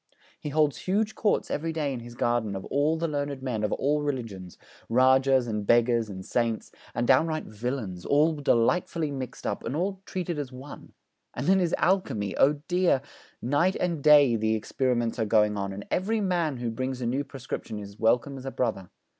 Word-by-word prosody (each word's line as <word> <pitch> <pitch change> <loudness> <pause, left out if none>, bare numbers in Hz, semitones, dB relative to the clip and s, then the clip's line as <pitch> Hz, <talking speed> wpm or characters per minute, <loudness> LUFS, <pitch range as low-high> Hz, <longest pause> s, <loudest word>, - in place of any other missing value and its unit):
He 150 - -5
holds 150 -1 +2
huge 210 +3 0
courts 210 - 0
every 165 +2 -1
day 150 -4 -2
in 125 - -4
his 120 0 -10
garden 120 -4 0
of 95 - -6
all 150 +3 +1
the 165 +1 -1
learned 145 -3 -3
men 115 -5 -2
of 105 - 0
all 150 +2 +1
religions 115 -11 -4 0.3
Rajahs 130 +1 +4
and 105 -2 -2
beggars 115 0 +3
and 95 -1 -7
saints, 115 -2 -1 0.2
and 120 +1 0
downright 155 +4 +3
villains, 110 -5 -4
all 150 +3 +3
delightfully 150 +3 +1
mixed 130 -3 -6
up, - - -2
and 135 - -3
all 190 +3 -2
treated 175 -4 -3
as 135 -3 -4
one. 130 +3 -11 0.4
And 125 - -3
then 190 +2 +4
his 175 -2 +1
alchemy! 140 - 0
Oh 145 - +5
dear, 175 -6 +2 0.4
night 145 +10 +2
and 170 -4 -1
day 145 -4 +6
the 110 0 +1
experiments 120 +1 -1
are 110 - +1
going 105 -1 +3
on, 100 -1 -3
and 100 +1 -7
every 215 +5 0
man 175 -8 0
who 120 -1 -3
brings 130 +2 -3
a 125 - -3
new 130 +4 0
prescription 130 -5 -6
is 100 0 -9
welcome 125 +5 +1
as 130 - -11
a - - -3
brother. 95 -9 -2
130 Hz, 190 wpm, -27 LUFS, 115-155 Hz, 0.4 s, day